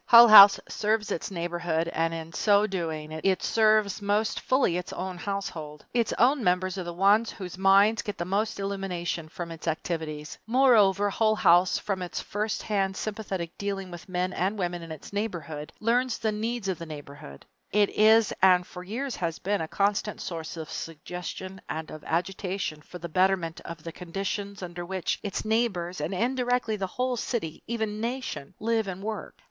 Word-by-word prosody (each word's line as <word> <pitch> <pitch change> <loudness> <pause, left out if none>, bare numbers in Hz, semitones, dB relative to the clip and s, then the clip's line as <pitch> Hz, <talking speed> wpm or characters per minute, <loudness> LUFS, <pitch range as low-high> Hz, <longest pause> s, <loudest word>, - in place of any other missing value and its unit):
Hull 235 0 +10
House 200 -2 +11
serves 215 0 0
its - - -2
neighborhood, 170 -2 -2
and 165 -1 0
in 165 0 -6
so 205 +1 +4
doing 160 -6 -4
it 185 +4 0
serves 215 -2 +3
most 205 +2 0
fully 255 -9 +2
its 180 0 -4
own 185 0 -4
household. 170 -7 -5
Its 235 -2 +1
own 260 +2 +4
members 185 +1 +1
are - - -3
the 175 - -5
ones 200 +6 +3
whose 185 -4 -7
minds 195 +4 +4
get 205 -3 -5
the 170 - -3
most 205 +4 -1
illumination 180 -5 -3
from 170 +1 -6
its 165 0 -9
activities. 160 -2 -3
Moreover, 210 -6 +4
Hull 215 +1 +2
House 175 -2 +4
from 195 -3 -3
its 180 - -4
first 210 +1 -3
hand 195 -2 0
sympathetic 195 -6 -4
dealing 195 -2 -3
with 175 +1 -10
men 180 0 -1
and 195 +4 -1
women 175 -2 -2
in 165 -1 -9
its 155 +5 -9
neighborhood 165 -8 -4
learns 240 +2 +1
the 220 -2 0
needs 220 0 -3
of 185 -4 -2
the 165 - -7
neighborhood. 140 - -10 0.3
It 205 -1 +3
is 220 +1 +5
and 180 -1 +6
for 180 0 -9
years 245 +8 -4
has 165 -2 -2
been 200 0 -1
a 160 - -3
constant 200 +3 0
source 165 -1 -5
of 160 -2 -7
suggestion 180 +3 -6
and 160 0 -4
of 155 - -9
agitation 180 -1 -2
for 180 - -10
the 170 0 -6
betterment 180 -1 +1
of 165 -2 -8
the 165 - -6
conditions 195 +3 -4
under 175 0 -6
which 185 0 -2
its 205 0 -4
neighbors 195 -7 0
and 150 - -2
indirectly 245 +1 0
the 195 -2 -3
whole 250 +5 -1
city, 210 -10 -3
even 220 -2 -2
nation 240 - -4
live 225 -1 0
and 190 0 -6
work. 220 0 -5
190 Hz, 180 wpm, -27 LUFS, 170-215 Hz, 0.3 s, House